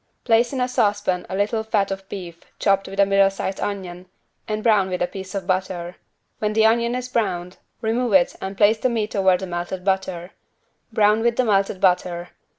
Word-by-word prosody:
Place 235 0 +3
in 270 - -3
a 250 - +1
saucepan 205 -6 0
a 190 - -3
little 210 +3 0
fat 205 -3 0
of 195 0 -6
beef 175 -4 -8
chopped 195 -1 +1
with 195 +1 -7
a 200 - +6
middle 195 0 +4
sized 195 0 -4
onion 185 -3 -5 0.4
and 215 0 -3
brown 210 -5 +3
with 180 -1 -2
a 175 - +2
piece 190 +2 -8
of 195 -2 -3
butter. 185 -2 -2 0.4
When 210 0 -1
the 220 0 +4
onion 235 +2 +2
is 250 0 -3
browned, 180 -7 -2 0.2
remove 230 +1 0
it 185 -2 +4
and 190 0 -5
place 215 +2 +4
the 255 - +1
meat 220 -3 -2
over 190 -2 +4
the 190 - -5
melted 175 +1 -5
butter. 190 -2 -1 0.6
Brown 215 0 +3
with 235 0 +1
melted 200 -5 +1
butter. 180 -1 +1
195 Hz, 195 wpm, -22 LUFS, 185-220 Hz, 0.6 s, a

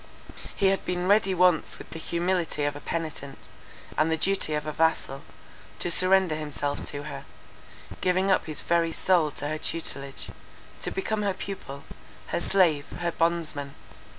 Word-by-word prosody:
He 195 - +4
had 195 - 0
been 180 0 -1
ready 195 -1 +4
once 180 -2 +3
with - - -12
the 165 - -6
humility 170 -2 0
of 145 0 0
a - - -6
penitent, 150 -4 -4 0.6
and 155 - +3
the 160 - +2
duty 185 -3 +1
of 150 0 -2
a 155 - -2
vassal, 155 -3 +1 0.6
to 175 - 0
surrender 185 0 +5
himself 150 -2 -3
to 145 0 -4
her; 145 -2 -7 0.8
giving 185 +1 +2
up 185 - +3
his 155 - -3
very 165 -1 +2
soul 175 -4 +3
to 145 0 -5
her 155 +1 -2
tutelage, 140 -5 -4 0.5
to - - -1
become 210 +2 -2
her 200 -2 0
pupil, 140 -8 -7 0.5
her - - -1
slave, 165 -8 +3
her 175 0 0
bondsman. 165 -4 -1
165 Hz, 160 wpm, -27 LUFS, 150-185 Hz, 0.8 s, surrender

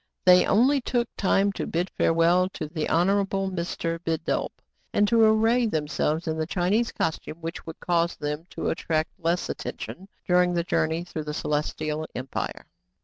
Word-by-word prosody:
They 180 0 +7
only 265 +6 +4
took 240 -1 0
time 195 +1 +2
to - - -4
bid 175 +3 -1
farewell 170 +3 +3
to 155 - -4
the 155 0 -3
Honorable 195 +2 +1
Mr. 170 -2 -3
Bidulph, 160 0 -1 0.4
and 205 - +3
to 230 +1 +4
array 225 +2 +4
themselves 155 -1 -1
in 160 0 -1
the 155 - -1
Chi 180 +1 0
nese 230 +3 +2
costume, 160 0 -3
which 165 +1 -6
would 160 - -8
cause 170 -1 +1
them 150 +3 -4
to - - -2
attract 160 -1 -1
less 170 +1 0
attention 190 +2 -6 0.2
during 180 -1 +3
the 170 - +1
journey 160 0 0
through 160 -3 -6
the 150 0 -4
Celestial 155 +1 -2
Empire. 130 +1 -4
170 Hz, 165 wpm, -26 LUFS, 160-195 Hz, 0.4 s, They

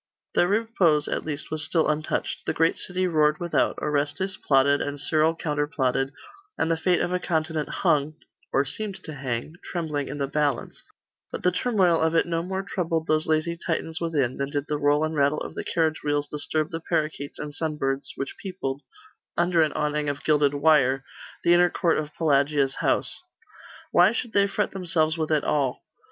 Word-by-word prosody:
Their 175 - +3
repose, 195 -8 +2
at - - -2
least, 155 -1 -5
was 155 -1 0
still 160 +2 +1
untouched. 155 0 -2
The - - 0
great 165 +1 +3
city 185 0 -2
roared 150 -3 +2
without; 175 -1 +1
Orestes 150 +6 -1
plotted, 140 -3 +3
and 145 0 -3
Cyril 155 +2 +2
counterplotted, 145 -4 -1 0.5
and 160 - +1
the - - +3
fate 175 +2 +1
of 175 - -1
a 180 - +1
continent 160 -3 -1
hung 150 +1 +1 0.4
or 135 - +2
seemed 205 +7 -4
to 155 - -7
hang 135 +3 -4
trembling 155 -5 -3
in 145 - -5
the 140 - 0
balance; 145 +1 -1 0.5
but - - -5
the 180 - +4
turmoil 185 -5 +2
of 160 +1 +2
it 165 - +4
no 165 -1 -1
more 190 +2 -3
troubled 165 -4 -2
those 155 0 +1
lazy 160 +2 +1
Titans 165 -1 -3
within, 145 -7 0
than 140 0 -2
did 145 0 -2
the 150 -1 -1
roll 145 +1 +3
and 155 0 -1
rattle 145 0 +2
of - - -6
the - - -5
carriage 160 -2 0
wheels 145 0 0
disturb 150 +1 -2
the 165 - -3
parakeets 155 -3 -2
and 150 -1 -6
sunbirds 140 -4 -2
which 135 - -5
peopled, 145 -8 -4 0.6
under 175 -1 +3
an 155 -1 +2
awning 150 -1 0
of 145 0 -4
gilded 145 -2 +3
wire, 140 -3 +3 0.4
the 170 - +5
inner 175 0 +5
court 170 -1 +1
of 150 -1 -5
Pelagia's 140 -3 +2
house. - - 0 0.7
Why 180 +5 +5
should 235 -1 -4
they 200 0 +4
fret 200 +1 -1
themselves 165 -4 0
with 160 -2 -2
it 155 -2 +2
all? 140 -4 0
155 Hz, 185 wpm, -25 LUFS, 145-170 Hz, 0.7 s, the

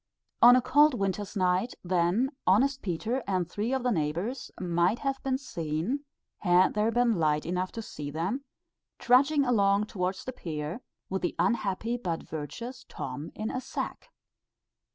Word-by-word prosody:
On 245 +1 +10
a 255 - +3
cold 290 +2 +5
winter's 200 0 -2
night, 185 +4 +1
then, 185 +8 +1 0.2
honest 260 +8 +3
Peter 220 +8 -2
and 185 -3 0
three 210 +7 -2
of 265 -2 0
the 250 - +2
neighbours 175 - -2
might 175 +3 +1
have 275 0 -2
been 265 -1 0
seen 185 - -3 0.3
had 180 -1 +4
there 215 +1 +2
been 235 -4 +2
light 150 -1 +1
enough 180 +2 -2
to 225 - -5
see 145 -7 -6
them 180 - -2 0.5
trudging 280 +4 +4
along 200 -4 +3
towards 185 -2 -3
the 255 - -4
pier, 155 +2 -5 0.3
with 190 - -1
the 175 - -1
unhappy 225 0 0
but 175 -8 -3
virtuous 160 - -6
Tom 150 +3 -6
in 215 +1 -3
a 255 - -3
sack. - - -5
205 Hz, 155 wpm, -29 LUFS, 175-245 Hz, 0.5 s, On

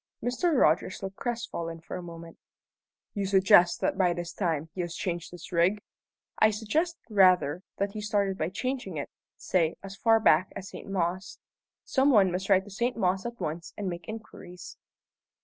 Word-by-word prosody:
Mr. 255 +5 +1
Rogers 165 +5 +2
looked 195 0 -6
crestfallen 225 -9 -4
for 165 - -8
a 180 - -5
moment. 170 -1 -10 0.7
"You 200 -2 -2
suggest 190 -2 +5
that - - 0
by 180 -2 +3
this 175 0 -5
time 165 -4 -2
he 185 - -3
has 170 -1 -4
changed 175 -1 -3
his 175 -2 -11
rig?" 180 +4 +2 0.6
"I 220 - +6
suggest, 300 - -1
rather, 185 -6 +4 0.2
that 200 0 -1
he 215 0 -6
started 205 -2 0
by 160 -3 -2
changing 245 - -4
it, 140 - -5 0.3
say, 170 -3 +1
as 195 0 -8
far 225 +2 +4
back 185 -4 +4
as 195 - -7
St. - - -10
Mawes. 185 0 -2 0.5
Some 270 +1 +2
one 200 -8 +5
must 190 +2 -3
ride 190 -1 +5
to 205 - -13
St. 240 +5 -1
Mawes 190 0 0
at 235 0 -8
once 160 +2 -5
and 205 - -3
make 175 -2 -5
inquiries." 215 -5 -9
190 Hz, 180 wpm, -28 LUFS, 175-215 Hz, 0.7 s, I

